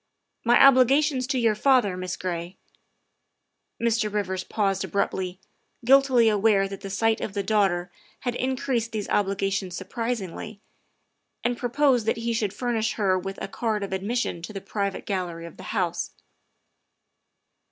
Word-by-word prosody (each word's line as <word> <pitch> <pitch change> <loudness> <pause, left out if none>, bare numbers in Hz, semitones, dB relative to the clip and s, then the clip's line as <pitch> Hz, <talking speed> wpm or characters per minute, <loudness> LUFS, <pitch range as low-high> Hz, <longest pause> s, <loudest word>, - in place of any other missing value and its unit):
My 240 +1 +5
obligations 270 0 +5
to 270 -1 0
your 230 -3 +3
father, 225 -4 +3
Miss 185 0 -4
Gray 175 0 -4 0.6
" - - -53
Mr. 230 -2 +1
Rivers 190 -3 -2
paused 195 -2 0
abruptly, 190 -2 -2 0.5
guiltily 260 -2 +5
aware 205 -2 +3
that 195 0 -8
the 195 - -6
sight 220 +3 +1
of 200 - -4
the 200 - -1
daughter 190 -4 +1 0.3
had 245 -2 -1
increased 250 -2 -1
these 215 -2 -3
obligations 195 -2 0
sur - - -7
prisingly, 225 -3 -4 0.9
and 240 +1 +1
proposed 245 -1 +2
that 225 - +1
he 230 0 -1
should 215 -3 0
furnish 225 0 -1
her 190 -3 +1
with 195 +2 -6
a - - -3
card 215 0 -2
of 195 - -4
admission 195 -2 -2
to 170 - -7
the 195 - -4
private 200 0 -3
gallery 175 -4 -3
of 170 - -11
the 185 - -10
House. 180 -5 -1
210 Hz, 150 wpm, -25 LUFS, 190-235 Hz, 0.9 s, My